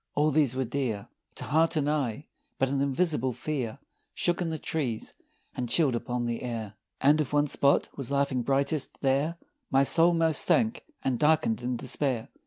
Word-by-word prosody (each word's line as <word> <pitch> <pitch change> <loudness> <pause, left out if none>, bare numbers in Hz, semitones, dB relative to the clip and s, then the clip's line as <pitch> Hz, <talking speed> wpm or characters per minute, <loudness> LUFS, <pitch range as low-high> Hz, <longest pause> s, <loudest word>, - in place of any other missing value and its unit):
All 150 +1 +2
these 140 -4 +2
were 130 0 -1
dear 115 -5 -3 0.3
To - - -5
heart 160 +2 +2
and 150 -2 0
eye 145 -3 -1 0.3
but 135 - +1
an 135 0 0
invisible 140 -2 0
fear 125 -3 -4 0.4
Shook 175 +1 0
in 170 - -1
the 160 - -3
trees 135 -8 -3 0.4
and 125 -2 -3
chilled 140 -1 +2
upon 120 0 -3
the 120 -1 -3
air, 115 -4 -5 0.3
And 150 +3 +4
if 145 -1 -4
one 145 0 +3
spot 140 -1 +2
was 135 -4 -4
laughing 140 -2 0
brightest 140 +3 -1
there 140 +5 +1 0.3
My 135 +1 +4
soul 165 +4 +5
most 165 -2 +2
sank 225 -1 +2 0.2
and 130 -3 0
darkened 150 -7 +2
in 125 +1 -2
despair! 130 -2 0
140 Hz, 180 wpm, -28 LUFS, 125-155 Hz, 0.4 s, soul